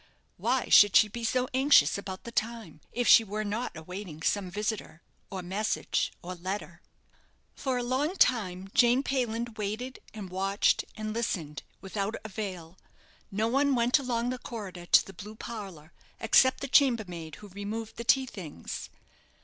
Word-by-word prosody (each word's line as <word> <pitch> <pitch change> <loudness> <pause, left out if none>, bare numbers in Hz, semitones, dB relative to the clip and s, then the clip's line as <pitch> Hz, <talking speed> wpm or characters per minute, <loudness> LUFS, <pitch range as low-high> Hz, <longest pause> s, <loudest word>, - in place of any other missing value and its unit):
Why 255 +1 0
should 205 -1 +7
she 215 - +7
be 235 +3 -7
so 250 +2 +1
anxious 275 +3 +5
about 190 -2 -6
the 235 - -8
time, 220 -9 -3
if 245 0 -1
she 230 - +8
were 215 0 -3
not 215 -2 -3
awaiting 165 -1 -8
some 200 0 0
visitor, 205 -4 -4 0.3
or 190 -2 -5
message, 200 +5 -1
or 180 +1 -5
letter? 185 +3 -5 0.7
For 260 -2 -2
a 245 - -1
long 270 +8 0
time 195 - +1
Jane 245 +2 +4
Payland 235 -4 -2
waited, 220 +6 -4
and 200 -4 -8
watched, 195 +2 +1
and 215 0 -4
listened, 170 -10 -3 0.2
without 200 +2 -3
avail. 190 -5 -6 0.5
No 215 +3 0
one 275 +3 +2
went 245 +4 +3
along 245 -2 -1
the 255 - -4
corridor 190 -8 -7
to - - +6
the 195 - -11
blue 210 +4 -9
parlour, 195 -9 -8 0.3
except 260 +3 +4
the 280 - -3
chambermaid 210 - +2
who 210 -1 -12
removed 210 +3 -6
the 235 - -4
tea 265 +2 +4
things. 180 - -7
215 Hz, 155 wpm, -29 LUFS, 190-240 Hz, 0.7 s, she